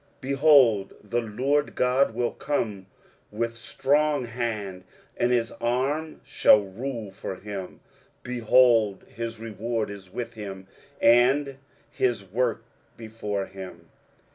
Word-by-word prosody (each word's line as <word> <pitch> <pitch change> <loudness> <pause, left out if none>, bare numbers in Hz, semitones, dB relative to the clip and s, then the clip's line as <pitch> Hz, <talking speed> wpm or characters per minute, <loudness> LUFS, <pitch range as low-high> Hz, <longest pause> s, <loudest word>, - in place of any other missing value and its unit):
23:040:010 135 - -3
Behold, 135 -8 +5
the 120 0 -1
Lord 130 +7 0
GOD 125 -1 +2
will 120 0 0
come 105 -9 -3 0.4
with 115 +2 -3
strong 140 +4 +1
hand, 110 -6 -4 0.3
and 120 - +1
his 120 -2 +1
arm 135 +6 -1
shall 105 - +5
rule 110 +2 -6
for 95 0 -6
him: 95 -1 -7 0.4
behold, 120 -4 +3
his 115 0 -6
reward 115 0 -3
is 95 -2 -11
with 120 +2 -5
him, 100 -3 -8 0.3
and 135 +4 +4 0.3
his 120 -5 0
work 115 +3 -1 0.3
before 105 -3 -4
him. 95 -1 -10
115 Hz, 115 wpm, -26 LUFS, 105-125 Hz, 0.4 s, Behold